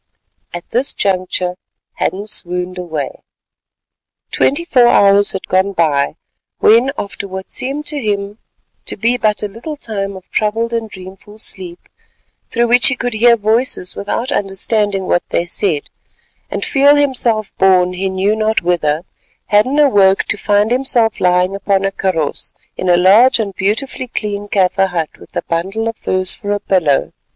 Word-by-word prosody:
At 175 0 -8
this 255 +4 +1
juncture 185 -2 -1 0.4
Hadden 200 +2 -2
swooned 180 -3 -1
away. 155 -6 -5 1.1
Twenty 320 +5 +1
four 250 -7 +4
hours 200 -2 +4
had 190 - -5
gone 190 +2 +1
by 150 -5 +1 0.4
when, 235 +5 +4
after 200 0 -5
what 190 0 -8
seemed 280 +4 -3
to 295 -2 -3
him 205 -1 -3 0.5
to - - -3
be 230 +4 +1
but 215 -3 0
a - - 0
little 230 +10 -7
time 200 -6 -4
of 185 - -15
troubled 225 +2 -1
and 225 -1 -2
dreamful 195 +2 -12
sleep, 180 -5 -7 0.6
through 235 0 +1
which 245 0 +5
he 280 - +2
could 245 -1 -3
hear 235 +2 +4
voices 220 -3 0
without 230 +6 -3
understanding 200 -1 -1
what 175 - +1
they 170 - 0
said, 175 -4 -1 0.7
and - - -3
feel 285 +1 +4
himself 245 -7 0
borne 185 -1 +4
he 190 +1 -2
knew 190 +3 0
not 220 -2 0
whither, 165 -2 0 0.4
Hadden 215 +7 +3
awoke 200 -10 +4
to - - +2
find 205 +1 +1
himself 245 -3 +1
lying 180 +1 +2
upon 195 -1 0
a 195 - 0
kaross 180 -7 -3 0.2
in 185 - -3
a 175 - +5
large 210 +9 +5
and 210 -4 -3
beautifully 225 +7 -2
clean 205 -3 -4
Kaffir 195 -1 +2
hut 170 -4 -4
with - - -17
a - - -2
bundle 195 +7 -2
of 230 - -3
furs 185 -3 0
for 205 -2 -3
a 205 - -1
pillow. 170 -9 +1
200 Hz, 160 wpm, -16 LUFS, 185-230 Hz, 1.1 s, which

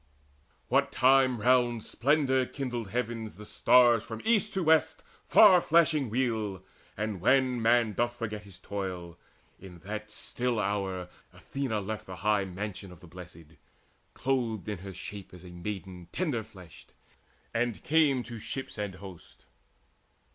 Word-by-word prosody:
What 140 +2 +2
time 130 -2 +4
round 120 -1 +2
splendour 130 -1 +1
kindled 120 -6 -4
heavens 115 -1 -3
the 105 - -10
stars 120 0 +4
From 115 -1 -7
east 215 -2 +2
to 190 - 0
west 160 -1 +3 0.2
far 190 -5 +7
flashing 155 -6 +3
wheel, 110 -5 -1 0.3
and 105 -3 -3
when 130 +2 +3
Man 115 -1 +3
doth 120 +3 -1
forget 110 -3 -5
his 100 -3 -13
toil, 90 -4 -5 0.4
in 90 -2 -12
that 105 +1 -5
still 120 +2 -2
hour 95 -3 -2 0.3
Athena 130 -6 -3
left 105 +2 -5
the 95 - -7
high 105 -2 +3
mansions 95 0 -6
of 85 - -16
the - - -15
Blest, 90 0 -11 0.8
Clothed 120 -6 -1
her 105 - -2
in 95 - -7
shape 100 0 -9
of 90 0 -12
a 90 - -10
maiden 90 -1 -7
tender 150 -10 -1
fleshed, 90 - -15 0.6
And 120 -1 -1
came 145 -5 +3
to 120 -2 -8
ships 115 +1 -5
and 100 -2 -3
host. 95 -3 -12
110 Hz, 145 wpm, -29 LUFS, 95-130 Hz, 0.8 s, far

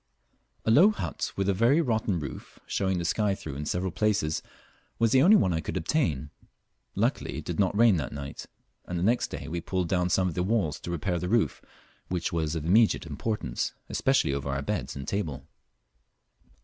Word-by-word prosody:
A 110 - +3
low 170 - +7
hut 215 - -3
with 95 -1 -1
a 100 - +3
very 115 - +4
rotten 110 - 0
roof, 70 -3 -8
showing 95 -1 0
the 85 - -2
sky 105 +2 +1
through 75 -6 -7
in 75 +2 -5
several 90 +1 -1
places, 100 -5 0 0.6
was 115 -1 +2
the 130 - +5
only 200 +8 +7
one 90 - +2
I 80 - 0
could 80 - -4
obtain. 80 - 0 0.6
Luckily - - -1
it - - -6
did 85 - -4
not 100 0 +2
rain 115 -4 +6
that 75 - -3
night, 70 -1 -7 0.4
and 90 - -4
the 85 - -1
next 120 +5 +2
day - - -7
we 85 +1 -3
pulled 90 -1 -2
down 90 -1 +1
some 95 +1 +2
of 90 - -2
the 90 - -1
walls 95 -6 0
to - - -7
repair 85 +1 -1
the 90 +1 -3
roof, 115 +1 +1 0.5
which 90 -2 -2
was 80 -1 -1
of 80 -2 -3
immediate 105 +4 +4
importance, 80 - -3
especially 70 - +2
over 70 0 -3
our 70 0 -2
beds - - -3
and 70 -1 -7
table. 80 -10 -3
90 Hz, 200 wpm, -28 LUFS, 80-110 Hz, 0.6 s, low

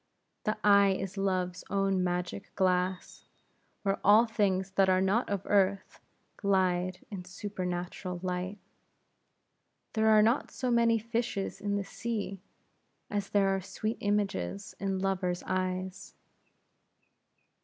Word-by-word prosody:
The 215 +1 0
eye 200 -1 +6
is 190 0 -4
Love's 185 -2 -1
own 195 -2 +1
magic 180 +2 -3
glass, 185 -1 0 0.6
where 195 -1 0
all 210 +4 +7
things 195 -4 0
that 195 0 +3
are 185 0 +4
not 195 +6 +1
of 200 -2 -1
earth, 195 -1 +1 0.4
glide 185 -2 +1
in 190 -3 -5
supernatural 180 -1 -4
light. 185 +2 -2 1.4
There 220 0 +3
are 215 -1 +7
not 230 +5 +2
so 255 -1 -2
many 235 -1 +4
fishes 230 -3 -3
in 200 0 -1
the 200 - -1
sea, 205 -3 -4 0.7
as 205 -1 -2
there 200 -1 +3
are 195 - -2
sweet 215 +4 -3
images 195 - -1
in 195 0 -1
lovers' 185 -2 -1
eyes. 185 0 -3
195 Hz, 120 wpm, -30 LUFS, 185-205 Hz, 1.4 s, all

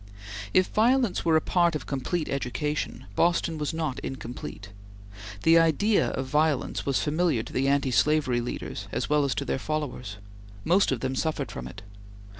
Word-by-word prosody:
If 185 - +4
violence 235 -1 +2
were 165 -1 +3
a 160 - +4
part 170 -1 +2
of 150 - -4
complete 150 +4 -2
education, 140 -1 -3
Boston 170 0 +1
was 150 -2 -1
not 160 -5 -3
incomplete. 120 -6 -7 0.7
The 165 +1 +6
idea 165 +7 +3
of 130 - -3
violence 150 0 0
was 140 - +1
familiar 155 -5 +1
to - - -11
the 135 +1 +1
anti 140 -1 +2
slavery 140 -3 +2
leaders 120 - -5
as - - -3
well 150 -1 +4
as 130 -5 -1
to - - -2
their - - -1
followers. 130 -8 -4 0.5
Most 185 +1 +3
of 125 -3 -1
them 130 0 -1
suffered 160 +4 -2
from 60 - -6
it. 100 +10 -11
150 Hz, 170 wpm, -27 LUFS, 130-165 Hz, 0.7 s, The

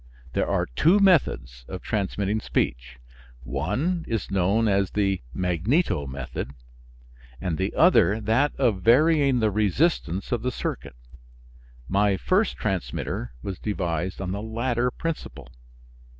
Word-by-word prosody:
There - - 0
are - - +1
two 160 - +3
methods 65 - +2
of 95 -1 -7
transmitting 100 0 -1
speech. - - -2 0.5
One 115 - -1
is 115 -3 -3
known 100 +4 +2
as 100 -2 +2
the 100 -2 0
magneto 90 - 0
method 65 0 -6 0.8
and 85 0 -2
the 95 +4 -1
other 160 - +5
that 115 +7 +1
of 115 -8 +1
varying 140 - +4
the 110 -1 +2
resistance 105 - 0
of 120 -3 0
the 125 - -1
circuit. - - -5 0.9
My 100 0 +2
first 195 - +1
transmitter 90 - -3
was 95 -3 -5
devised 90 -3 -2
on 95 -1 -3
the 100 +2 -3
latter 120 +2 -1
principle. 75 - -6
100 Hz, 125 wpm, -25 LUFS, 90-125 Hz, 0.9 s, other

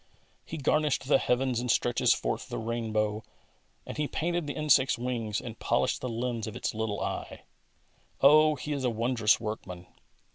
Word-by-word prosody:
He 165 - -7
garnished 150 -1 +1
the 135 - +4
heavens 125 -1 +1
and 125 +1 -3
stretches 120 +1 +2
forth - - -1
the - - -4
rain 115 0 -3
bow, 105 0 0 0.6
and - - -7
He 150 -1 0
painted 170 0 -2
the 145 - -4
insect's 140 -4 +3
wings 115 -4 -2
and 115 -2 -8
polished - - 0
the 125 - -3
lens 115 -1 -3
of 110 - -7
its - - -2
little 110 -2 -2
eye. - - -5 0.8
Oh, 155 +2 +6
He 150 +2 -4
is 140 -2 -3
a 125 - +2
wondrous 115 -1 +2
workman 100 -5 -6
125 Hz, 175 wpm, -29 LUFS, 110-140 Hz, 0.8 s, Oh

